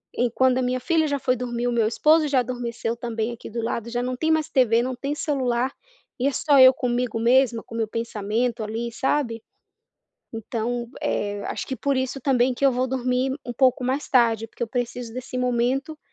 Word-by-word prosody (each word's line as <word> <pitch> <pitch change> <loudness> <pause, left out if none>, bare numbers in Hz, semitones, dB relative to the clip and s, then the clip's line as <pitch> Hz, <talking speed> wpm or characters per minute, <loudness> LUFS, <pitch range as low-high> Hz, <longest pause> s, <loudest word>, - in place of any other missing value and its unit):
em 245 - +2
quando 260 0 +3
a - - +1
minha 255 +1 0
filha 320 +2 +1
já 285 -1 -1
foi 255 0 +1
dormir, 240 0 -3
o - - +1
meu 230 -2 +2
esposo 305 +7 +3
já 275 -2 +2
adormeceu 240 -1 -3
também 230 -1 -3
aqui 235 - -9
do 230 +1 -4
lado, 235 0 -3
já 245 0 -1
não 255 0 -2
tem 320 +4 0
mais 315 -1 +1
TV 235 -3 +3
não 255 0 -2
tem 280 +3 -3
celular, 260 -4 0 0.5
e 265 - +2
é - - +2
só 285 0 +3
eu 260 0 +9
comigo 245 -2 -1
mesma 240 -1 +3
com 230 - -11
o - - -3
meu 225 -1 0
pensamento 225 +1 -2
ali, 230 +2 -4
sabe? 235 -2 -1 0.9
Então, 235 +2 -3
eh, 205 0 -2
acho - - -4
que 265 - -3
por 280 -1 0
isso 260 +1 -2
também 255 -1 +2
que 280 - -2
eu - - +5
vou 255 +1 0
dormir 255 0 0
um 245 - -3
pouco 255 0 +3
mais 265 +3 -1
tarde 230 -3 +3
porque 235 - -9
eu - - 0
preciso 245 -1 -4
desse 255 0 -5
momento 250 +5 0
245 Hz, 210 wpm, -24 LUFS, 235-260 Hz, 0.9 s, eu